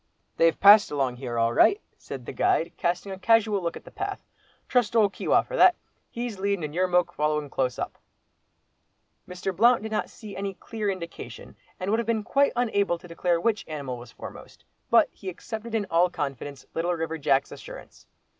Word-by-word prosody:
"They've 165 0 +3
passed 205 +1 +8
along 135 -4 -1
here 120 -2 -5
all 115 0 +2
right," 400 - +5 0.2
said 130 -3 -9
the - - -5
guide, 165 - +1
casting 180 +3 -2
a 190 - -6
casual 215 -1 +3
look 170 -1 -3
at - - -13
the - - -12
path; - - -5 0.4
"trust 245 -2 +1
old 210 -3 +4
Keewah - - +2
for - - -6
that, 370 -6 +6 0.3
he's 235 -4 -5
leadin' 200 -3 0
and 150 -1 -4
your 185 +2 +1
moke 180 -1 +2
following 150 -1 -1
close 125 -3 -1
up." - - -5 1.3
Mr. 180 +1 -4
Blount 235 +4 +4
did 220 - -5
not 215 - -1
see 215 -3 -10
any 195 0 -4
clear 215 0 -4
indication, 180 -3 -7 0.2
and 185 +2 -2
would 225 - +2
have 235 - -3
been 225 -2 0
quite 280 +5 +2
unable 200 -7 +1
to 175 - -14
declare 170 0 0
which 215 +4 0
animal 140 -5 -5
was 120 -1 -12
foremost. - - -11 0.2
But - - +6
he 190 - -7
accepted 220 +5 -6
in 215 -2 0
all 170 +2 +4
confidence 140 -3 -5
Little 175 +2 0
River 160 0 -3
Jack's 140 -2 +2
assurance. - - -11
185 Hz, 190 wpm, -26 LUFS, 155-220 Hz, 1.3 s, passed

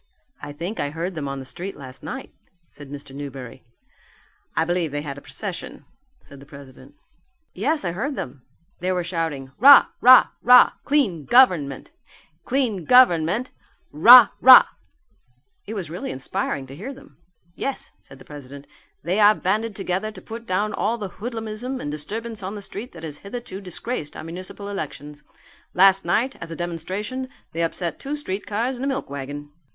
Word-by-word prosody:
"I 145 - -7
think 170 +9 -6
I 145 - -1
heard 165 +5 -4
them 155 -4 -5
on 140 0 -4
the 135 - -8
street 180 +7 -7
last 135 -1 -11
night," 265 +1 -7 0.3
said 145 -4 -13
Mr. 140 -1 -9
Newberry. 135 -4 -8 0.9
"I 160 - +2
believe 175 -2 -1
they 145 0 -4
had 140 -1 -6
a - - -22
procession," 195 +3 -7 0.3
said 140 - -14
the 140 - -14
president. 140 -3 -14 0.6
"Yes, 305 -5 -1
I 175 - -1
heard 265 - -3
them; 130 - -7 0.4
they 185 +2 -1
were 180 -1 -1
shouting 165 -6 -4
'Rah! 280 +4 +8
rah! 255 +1 +8
rah! 250 0 +7
Clean 210 - +1
Government! 175 - +3 0.5
Clean 240 -9 -1
Government! 225 -1 +4 0.4
Rah! 235 +12 +9
rah!' 260 0 +9 1.0
It 220 - -5
was 175 -7 -5
really 175 - -5
inspiring 135 +2 -3
to 135 +1 -11
hear 245 - -7
them." 280 +2 -17 0.4
"Yes," 275 +9 -5
said 135 - -15
the - - -16
president, 140 -1 -11 0.4
"they 180 +6 0
are 210 0 +6
banded 215 +3 -1
together 195 +2 -3
to 190 - -11
put 230 +4 -9
down 210 +3 -1
all 225 +3 -1
the 205 -4 -5
hoodlumism 230 +2 -4
and 145 - -5
disturbance 215 +9 -4
on 190 +2 -5
the 205 - -7
street 215 +6 -7
that - - -12
has 150 -2 -7
hitherto 200 -2 -7
disgraced 185 -3 -5
our - - -7
municipal 185 +4 -7
elections. 150 -6 -7 0.5
Last 195 0 +5
night, 235 +10 0
as 165 - -7
a 165 - -6
demonstration, 190 +10 -4 0.2
they 165 - -3
upset 170 0 -2
two 280 +2 -4
streetcars 230 0 -3
and 260 - -4
a - - 0
milk 275 0 -2
wagon." 145 +1 -7
185 Hz, 170 wpm, -23 LUFS, 150-230 Hz, 1.0 s, Rah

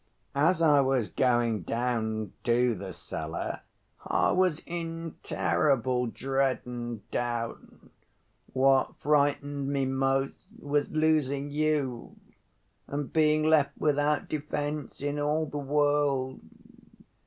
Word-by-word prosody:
As 165 +5 +3
I 145 -3 +6
was 130 -4 +1
going 120 -4 +1
down 110 -1 -2
to 120 0 +3
the 95 -2 -6
cellar, - - -5 0.4
I - - +2
was 185 -4 +2
in 165 -1 -5
terrible 120 - +1
dread 135 +2 0
and 120 -3 -6
doubt. 120 -1 -2 0.9
What 135 0 +3
frightened 145 -1 +1
me 140 -1 +1
most 135 +1 -1
was 145 0 -1
losing 145 -3 +1
you 145 -5 -1 0.7
and 145 0 -4
being 155 -1 +3
left 150 -3 +3
without 150 0 +1
defense 150 -1 -4
in 145 +1 -2
all 150 +2 +1
the 145 -1 -5
world. 145 -2 +1
140 Hz, 110 wpm, -28 LUFS, 125-150 Hz, 0.9 s, I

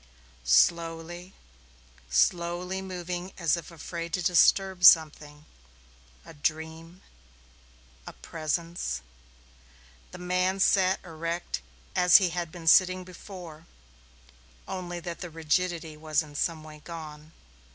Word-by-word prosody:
Slowly, 170 - +1 0.7
slowly, 175 - 0
moving 180 0 -6
as 170 -2 +2
if 170 - -8
afraid 170 0 -7
to 180 - -1
disturb 185 +2 +3
something 150 -3 +5 0.8
a - - -12
dream 160 +3 -4 1.0
a - - -8
presence 165 - -4 1.1
the - - -10
man 180 +2 0
sat 190 -1 +3
erect 165 - -4 0.3
as 180 -2 +7
he 190 -3 +2
had 170 -1 -4
been 170 -1 -10
sitting 185 +2 +5
before, 175 -3 -11 1.0
only 175 -2 -5
that 170 0 -6
the 175 - -5
rigidity 165 0 -1
was 155 0 0
in 150 -1 -14
some 155 +2 -2
way 155 -1 -12
gone. 155 -1 -10
170 Hz, 110 wpm, -27 LUFS, 160-180 Hz, 1.1 s, as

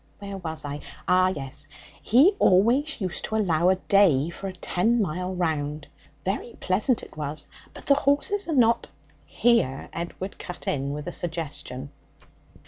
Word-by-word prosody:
Where 200 -1 -7
was 160 -4 -5
I? 145 0 -4 0.3
Oh 185 +1 +5
yes; 140 -8 -5 0.3
he 280 - +5
always 240 +12 +3
used 185 -4 -3
to 220 - -3
allow 180 -5 +3
a 190 - +4
day 180 -6 +3
for 195 - -6
a 190 - -5
ten 185 +6 +1
mile 180 -1 -2
round. 150 -4 -2 0.4
Very 205 +5 -3
pleasant 210 +6 +1
it - - -12
was, 150 -1 -5 0.3
but - - -12
the 280 - +6
horses 285 +9 +1
are 320 - 0
not 235 -2 +3 0.3
' - - -33 0.2
Here 230 - +3
Edward 175 +3 -5
cut 180 - -8
in 140 0 -1
with 150 +3 -5
a - - -2
suggestion. 150 -6 -5
185 Hz, 160 wpm, -26 LUFS, 155-220 Hz, 0.4 s, the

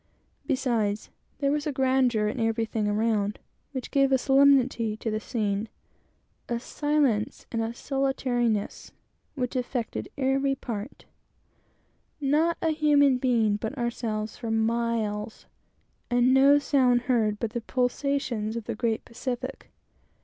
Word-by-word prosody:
Beside, 235 -7 0 0.4
there 280 0 +1
was 295 +1 -1
a - - 0
grandeur 260 -5 +2
in 215 - -3
everything 225 -1 0
around, 210 -1 0 0.3
which 260 -3 -6
gave 275 -1 +3
almost 265 -1 +2
a - - -10
solemnity 265 -5 +4
to 225 - -3
the 215 - -1
scene: 210 -1 -2 0.8
a 235 -1 -1
silence 280 -5 0
and 230 - -1
solitariness 250 -6 -1 0.4
which 250 -2 -3
affected 245 -2 -3
everything! 270 -4 -1 1.3
Not 305 +4 +2
a 325 - +2
human 290 -4 +4
being 230 -5 +2
but 220 +6 -5
ourselves 225 -3 -3
for 230 - -5
miles; 225 -1 -1 0.6
and 245 +1 +3
no 275 +2 +6
sound 255 -4 +3
heard 230 -4 +1
but 225 0 -3
the 240 0 -3
pulsations 245 -3 -1
of 230 - -4
the - - -4
great 225 0 -1
Pacific! 250 +2 -5
245 Hz, 125 wpm, -27 LUFS, 220-270 Hz, 1.3 s, no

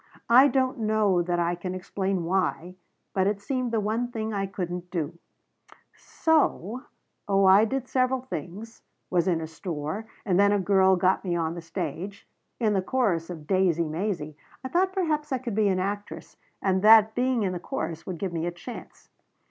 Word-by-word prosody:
I 260 +4 +8
don't 260 -2 0
know 215 -4 +2
that 175 0 -1
I 170 0 +1
can 180 +1 -5
explain 190 0 -2
why 180 -1 -1 0.4
but 190 0 +2
it 205 0 0
seemed 255 +3 -2
the 225 - +1
one 220 +4 -1
thing 220 -2 -4
I 195 -1 -1
couldn't 180 -2 -5
do, 170 -1 -4 0.8
so 260 - 0 0.4
oh 195 -1 +3
I 195 +3 +7
did 260 +2 -3
several 255 0 +1
things 215 - -7 0.3
was 180 -1 +2
in 175 -3 +2
a 160 - -4
store 160 +4 -5 0.2
and 185 -2 +2
then 200 0 +5
a 205 - +3
girl 190 0 +4
got 185 +1 +2
me 175 -3 -1
on 165 -1 -1
the 170 - -7
stage 175 +4 -6 0.3
in 220 -3 +2
the 195 - +2
chorus 190 -7 0
of 160 -4 -8
'Daisey 175 -2 +2
Maisey.' 155 -2 -3 0.3
I 260 - -4
thought 370 +5 +2
perhaps 310 -6 -1
I 260 - +1
could 240 -3 -5
be 210 0 +2
an 190 -2 +1
actress, 205 +2 -4 0.3
and 190 -1 +2
that 220 +1 +7
being 250 -1 +1
in 185 -2 -1
the 175 - -4
chorus 165 -1 -5
would 185 -2 -4
give 185 0 -4
me 165 0 -2
a - - -1
chance." 175 +8 -11
195 Hz, 190 wpm, -26 LUFS, 175-225 Hz, 0.8 s, I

